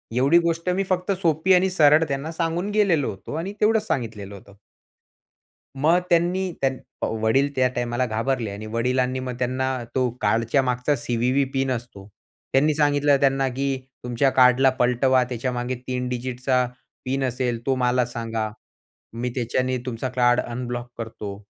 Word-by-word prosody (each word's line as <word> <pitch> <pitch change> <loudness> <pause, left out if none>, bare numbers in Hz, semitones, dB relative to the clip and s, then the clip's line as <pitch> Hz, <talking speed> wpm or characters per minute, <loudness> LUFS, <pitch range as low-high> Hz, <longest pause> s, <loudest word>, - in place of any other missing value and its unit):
एवढी 135 +7 +4
गोष्ट 170 +1 -1
मी 185 +2 +1
फक्त 185 +1 0
सोपी 165 +3 +3
आणि 185 +1 +3
सरळ 155 -3 +5
त्यांना 140 +3 -3
सांगून 170 +3 -2
गेलेलो 190 - +2
होतो 95 +6 -9
आणि 185 +5 -4
तेवढंच 215 0 +3
सांगितलेलं 105 -5 -3
होतं. 100 +1 -15 1.2
मग 155 +6 +3
त्यांनी, 180 +2 +2
त्यांन 135 -1 +1 0.3
अ, - - +2
वडील 135 +6 +2
त्या 130 -1 +3
टाईमाला 120 0 -1
घाबरले 115 0 -1
आणि 100 +2 -7
वडिलांनी 125 +3 0
मग 130 -1 -4
त्यांना 130 +1 -1 0.3
तो 130 -1 +2
कार्डच्या 115 +4 +2
मागचा 125 +3 0
सी-व्ही-व्ही 125 +3 0
पिन 135 0 0
असतो 115 -5 -6 0.4
त्यांनी 150 +3 +3
सांगितलं 145 -1 +3
त्यांना 135 -1 +2
की 135 +1 -1 0.3
"तुमच्या 125 +3 +1
कार्ड 130 +1 +5
पलटवा, 125 +1 +3
त्याच्या 125 +1 -3
मागे 120 +1 -2
3 125 -1 -2
डिजिटचा 125 +1 -1 0.4
पिन 135 +1 -1
असेल, 125 -2 -1
तो 135 - +2
मला 125 0 +2
सांगा, 115 -2 -3 0.6
मी 120 +2 -3
त्याच्याने 130 +1 -1
तुमचं 125 +1 -3
कार्ड 120 0 +4
अनब्लॉक 120 0 -5
करतो." 110 -3 -6
130 Hz, 155 wpm, -23 LUFS, 120-145 Hz, 1.2 s, सरळ